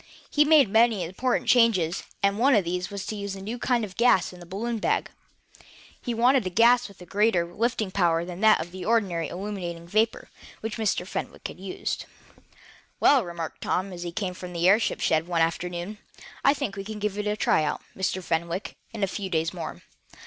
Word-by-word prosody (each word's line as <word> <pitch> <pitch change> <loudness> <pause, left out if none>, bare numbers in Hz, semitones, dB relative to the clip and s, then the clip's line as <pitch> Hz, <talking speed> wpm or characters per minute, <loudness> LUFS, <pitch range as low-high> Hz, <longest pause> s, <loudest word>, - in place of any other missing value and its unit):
He 295 - +5
made 300 -4 +6
many 220 -1 +3
important 215 +9 -1
changes, 200 -9 +3 0.2
and 200 +1 +2
one 265 +2 +5
of 200 -4 +2
these 180 +1 -2
was 200 -1 -5
to 215 - -4
use 200 -1 -4
a - - -8
new 220 +5 -5
kind 240 -3 +1
of 190 -2 -12
gas 235 -7 +3
in 180 - -12
the 175 - -12
balloon 225 +5 -3
bag. - - 0 0.9
He 240 -2 -3
wanted 245 -1 +3
a - - -1
gas 235 +6 +4
with 200 - -17
a - - -12
greater 200 -3 +2
lifting 225 -3 -1
power 170 -3 +2
than 175 0 -7
that 220 -1 +6
of 170 +2 -5
the 185 0 -7
ordinary 185 -6 +1
illuminating 175 -3 -5
vapor 220 +5 0 0.3
which 225 +1 -4
Mr. 210 -5 0
Fenwick - - -5
had - - -11
used. 190 0 -4 0.9
"Well," 275 -4 +5
remarked 170 -2 -6
Tom, 185 +1 -1
as 175 - -8
he 175 -1 -4
came 185 0 -3
from 180 -1 -8
the 170 +1 +1
airship 210 +4 +3
shed 160 +1 +2
one 170 -2 +1
afternoon, 175 +4 -3 0.4
"I 280 - +5
think 245 -9 -3
we 195 - -5
can 215 +1 -6
give 210 -1 -2
it 210 - -2
a 210 0 0
try 155 - +2
out, 150 - -2
Mr. 190 -1 -2
Fenwick, 170 +3 -2 0.2
in 225 -3 -4
a - - +3
few 195 0 -4
days 165 0 0
more. 170 -3 -7
195 Hz, 205 wpm, -26 LUFS, 175-225 Hz, 0.9 s, made